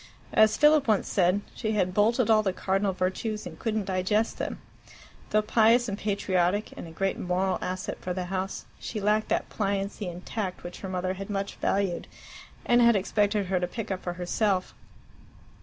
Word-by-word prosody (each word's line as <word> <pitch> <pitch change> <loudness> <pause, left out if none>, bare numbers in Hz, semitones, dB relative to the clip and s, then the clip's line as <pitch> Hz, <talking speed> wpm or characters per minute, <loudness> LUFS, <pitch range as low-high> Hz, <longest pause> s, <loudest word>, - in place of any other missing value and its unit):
As 215 0 +5
Philip 300 -2 +5
once 215 -3 +2
said, 185 +1 +2
she 220 0 -2
had 185 -3 +1
"bolted 225 +4 +3
all 220 -1 +5
the 195 -3 -1
cardinal 195 +1 0
virtues 190 +4 -2
and 165 -3 -9
couldn't 220 -3 -1
digest 195 +4 0
them." - - -3 0.7
Though 215 0 +2
pious 230 +3 +4
and 200 - -2
patriotic, 200 -1 0
and - - -8
a - - -10
great 195 +4 -1
moral 185 +1 0
asset 185 +1 -4
for 180 - -4
the 180 0 -2
house, 190 +1 -3
she 220 - -5
lacked 210 +1 +1
that - - 0
pliancy 200 -1 -2
and 175 +1 -7
tact 200 -5 -4
which 175 0 -8
her 190 - -6
mother 185 0 -2
so 195 - -4
much 200 0 -2
valued, 195 -3 0 0.6
and 240 0 +4
had 235 -1 +6
expected 205 +1 +1
her 185 0 0
to 180 - -1
pick 220 +3 -5
up 185 - -2
for 175 - -3
herself. 185 +2 0
195 Hz, 185 wpm, -27 LUFS, 185-215 Hz, 0.7 s, had